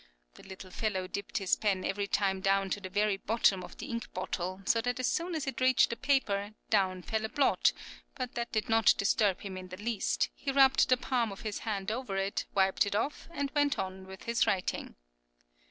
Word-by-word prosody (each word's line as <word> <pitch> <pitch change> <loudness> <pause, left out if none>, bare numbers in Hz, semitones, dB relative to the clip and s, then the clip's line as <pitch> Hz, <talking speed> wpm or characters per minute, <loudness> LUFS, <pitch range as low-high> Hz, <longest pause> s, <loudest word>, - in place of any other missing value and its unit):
(The - - -15
little 190 -1 -11
fellow 190 -2 -1
dipped 200 +1 -4
his 195 -2 +2
pen 195 -3 0
every 200 +1 -1
time 195 -2 +1
down 195 0 +2
to 205 - -1
the 185 - -6
very 205 +1 +1
bottom 200 -3 +2
of - - -11
the - - -6
ink 235 -5 -5
bottle, 185 +2 -3
so 230 - +3
that 245 +2 -2
as 255 - 0
soon 340 +5 -1
as 310 - -2
it 265 -2 -4
reached 255 -2 +4
the - - -1
paper, 210 -7 0 0.2
down 185 -3 +2
fell 220 +3 -2
a 220 - -2
blot; 280 +2 +3 0.4
but 255 -2 -4
that 235 0 -3
did 215 -1 -1
not 225 -1 +5
disturb 200 -1 +2
him 190 -2 -6
in 185 0 -7
the 185 0 -9
least, 215 0 -1
he 275 - -3
rubbed 270 -1 +5
the 255 - +5
palm 245 -3 0
of 195 - -9
his 215 -3 -4
hand 205 -2 -3
over 225 -4 -3
it, 195 +1 -1
wiped 190 +1 +3
it 200 - -2
off, 255 +8 -2
and 285 -4 -3
went 290 -1 +2
on 190 0 -5
with 190 0 -10
his 235 0 +1
writing.) 185 -2 -1
210 Hz, 220 wpm, -31 LUFS, 195-240 Hz, 0.4 s, not